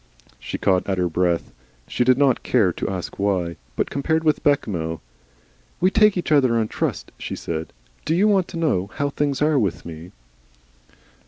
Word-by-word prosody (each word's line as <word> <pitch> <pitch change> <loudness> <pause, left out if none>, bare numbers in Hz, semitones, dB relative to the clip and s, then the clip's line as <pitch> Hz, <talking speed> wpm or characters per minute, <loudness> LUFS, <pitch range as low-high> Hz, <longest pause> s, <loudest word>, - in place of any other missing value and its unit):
She - - -5
caught 95 0 +1
at 95 - 0
her 90 -1 +1
breath. 85 0 0 0.4
She - - 0
did 130 0 +4
not 140 -2 +3
care 100 -8 +2
to - - -3
ask 95 -1 -5
why. 95 -4 0 0.2
But - - -1
compared 160 +3 0
with 155 -1 +2
Bechamel! 85 - 0 0.8
"We 185 +2 +3
take 210 -2 +4
each 175 - -3
other 130 -6 +4
on 110 -1 0
trust," - - -3
she - - -5
said. 80 -1 -5 0.3
"Do 160 - 0
you 200 +5 +4
want 195 -4 +3
to 175 - -7
know 100 - 0
how 145 0 -1
things 145 0 0
are 150 -2 +3
with 100 -7 -2
me?" 85 +1 -9
120 Hz, 180 wpm, -22 LUFS, -, 0.8 s, did